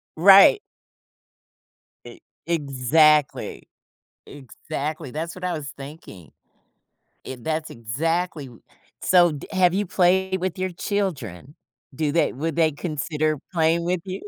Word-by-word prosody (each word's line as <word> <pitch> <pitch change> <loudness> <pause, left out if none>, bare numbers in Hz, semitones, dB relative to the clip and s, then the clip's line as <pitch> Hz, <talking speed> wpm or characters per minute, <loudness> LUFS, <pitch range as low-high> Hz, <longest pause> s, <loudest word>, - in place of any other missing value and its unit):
Right. 195 - +7 1.5
E - - -12 0.3
exactly. 150 -1 +1 0.6
Exactly, 145 +2 -6
that's 165 +3 -5
what 185 - -11
I 180 - -1
was 150 -4 -5
thinking. 135 - -11 1.0
I 130 - -6
that's 160 +4 -3
exactly 160 - -3
w 120 -3 -15 0.4
so 175 -2 +5
d 145 - -8
have 185 -2 +3
you 200 +2 -1
played 190 +1 +1
with 185 0 -3
your 185 0 -2
children? 155 - -4 0.4
Do 150 +2 -1
they 165 +3 +1
would 155 +4 -4
they 160 -2 +3
consider 155 0 -2
playing 165 0 +1
with 180 0 -1
you? 190 0 -6
160 Hz, 120 wpm, -23 LUFS, 145-180 Hz, 1.5 s, Right